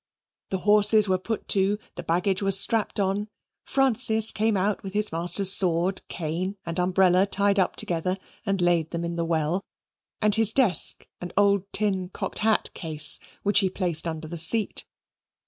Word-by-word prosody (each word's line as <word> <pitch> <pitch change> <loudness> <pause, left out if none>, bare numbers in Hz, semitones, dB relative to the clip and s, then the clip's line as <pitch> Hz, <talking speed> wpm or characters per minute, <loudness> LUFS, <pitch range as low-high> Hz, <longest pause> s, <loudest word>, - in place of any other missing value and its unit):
The 190 - -2
horses 210 +2 +3
were 185 -1 0
put 220 +3 -5
to. 200 +1 +1 0.2
The - - -8
baggage 180 +3 -1
was 195 -1 +3
strapped 225 -2 +1
on. 200 +2 -1 0.4
Francis 230 -4 +3
came 215 -1 0
out 200 +2 -1
with 195 -1 -9
his 210 0 -1
master's 175 +4 +2
sword, 185 -1 +2
cane, 180 +5 -5
and 170 +1 -4
umbrella 185 +1 +2
tied 200 0 +1
up 185 - 0
together, 180 +2 -2 0.3
and 195 -4 -2
laid 170 -2 +1
them 170 0 -4
in 170 0 -5
the 170 0 -2
well, 165 +3 -1 0.6
and 210 -1 +1
his 220 0 +1
desk 225 - +4
and 175 -1 -8
old 200 -1 +1
tin 190 -3 -1
cocked - - -4
hat 220 0 0
case, 155 -3 -1 0.2
which 205 0 +3
he 195 -2 +1
placed 175 -3 -1
under 160 -1 -6
the 170 +2 -7
seat. 205 +7 +2
190 Hz, 170 wpm, -24 LUFS, 175-205 Hz, 0.6 s, desk